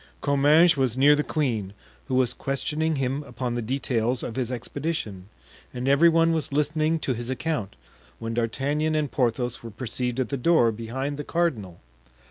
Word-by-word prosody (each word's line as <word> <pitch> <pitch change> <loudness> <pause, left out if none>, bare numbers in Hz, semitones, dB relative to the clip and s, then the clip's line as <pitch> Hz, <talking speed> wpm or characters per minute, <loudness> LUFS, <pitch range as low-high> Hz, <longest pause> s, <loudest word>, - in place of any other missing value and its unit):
Comminges 150 +4 +4
was 130 -3 +1
near 145 +2 +6
the 150 - 0
queen, 115 - -1 0.3
who 130 - -1
was 130 -2 +2
questioning 155 +3 -1
him 135 +1 -1
upon 130 -4 -4
the 120 - -2
details 125 0 -1
of 115 - -5
his 125 -3 -1
expedition, 120 - -4 0.5
and 125 +1 -3
every 140 +5 +6
one 165 0 +3
was 160 -3 -2
listening 155 +2 +1
to 140 -4 -1
his 120 +1 -5
account, 130 - -2 0.4
when 115 0 -5
D'Artagnan 140 +7 0
and 150 -3 0
Porthos 120 -1 -1
were 115 - -8
perceived 125 +3 -3
at 130 - -1
the 140 - -2
door, 125 -4 +4
behind 130 +6 -4
the 145 - -4
cardinal. 115 - -2
135 Hz, 170 wpm, -25 LUFS, 120-150 Hz, 0.5 s, near